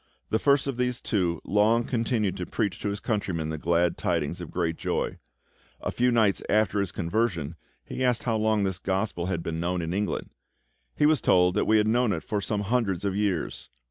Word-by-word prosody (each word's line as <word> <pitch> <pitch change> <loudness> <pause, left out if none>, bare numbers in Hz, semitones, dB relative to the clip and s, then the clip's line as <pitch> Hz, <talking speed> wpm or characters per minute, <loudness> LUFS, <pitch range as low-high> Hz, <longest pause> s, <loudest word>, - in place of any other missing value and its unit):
The 110 - +2
first 140 +1 +3
of 135 -3 -3
these 125 -1 0
two 85 -6 -1
long 110 +3 +3
continued 115 -5 0
to 90 - -4
preach 105 -4 -2
to 100 - -2
his 100 0 -3
countrymen 95 -9 -2
the 80 -1 -4
glad 85 +1 +1
tidings 85 0 -1
of 85 - -7
great 85 -2 -1
joy. - - -2 0.6
A - - -3
few 125 +1 +2
nights 110 -4 +3
after 105 -1 +2
his 100 -2 -1
conversion 85 -4 -1 0.3
he 130 - -4
asked 125 -2 +1
how 115 -2 0
long 110 -1 +2
this 95 -2 -1
Gospel 95 -2 -1
had 85 -3 -2
been 80 0 -3
known 90 +2 -1
in 85 0 -3
England. 100 +2 -2 0.6
He - - +3
was 150 -5 +4
told 90 0 +4
that - - +1
we 110 - +5
had 105 0 +3
known 120 -1 +2
it 80 - -4
for 105 -1 -2
some 105 +1 -1
hundreds 105 -3 0
of 100 -1 0
years. 100 -5 -2
100 Hz, 205 wpm, -27 LUFS, 90-110 Hz, 0.6 s, we